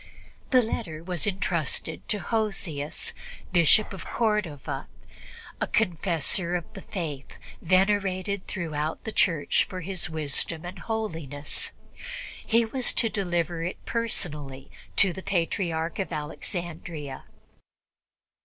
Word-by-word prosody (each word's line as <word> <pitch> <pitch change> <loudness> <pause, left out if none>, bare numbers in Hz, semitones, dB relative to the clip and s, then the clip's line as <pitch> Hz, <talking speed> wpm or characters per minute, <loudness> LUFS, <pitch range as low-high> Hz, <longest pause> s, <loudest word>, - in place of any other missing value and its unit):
The 255 -2 +6
letter 165 -8 -3
was 175 +1 0
entrusted 170 -5 0
to 210 - +3
Hosius, 190 -10 0 0.4
Bishop 180 +5 +5
of 190 - -6
Cordova, 210 - 0 0.7
a - - +2
confessor 170 0 +2
of 175 -3 -1
the 195 - -7
Faith, 150 -9 -4 0.3
venerated 195 +1 +2
throughout 155 -4 -2
the 220 - -3
Church 165 -8 +4
for 185 -1 -5
his 185 -1 -1
wisdom 160 +2 0
and 180 +1 -6
holiness. 165 - -2 0.7
He 230 0 +4
was 250 +3 +1
to 225 - +3
deliver 175 -5 0
it 175 - -2
personally 150 - -2 0.2
to 195 -3 +6
the 190 - -6
Patriarch 170 -2 0
of 190 - -1
Alexandria. 155 -2 -4
175 Hz, 110 wpm, -28 LUFS, 160-200 Hz, 0.7 s, The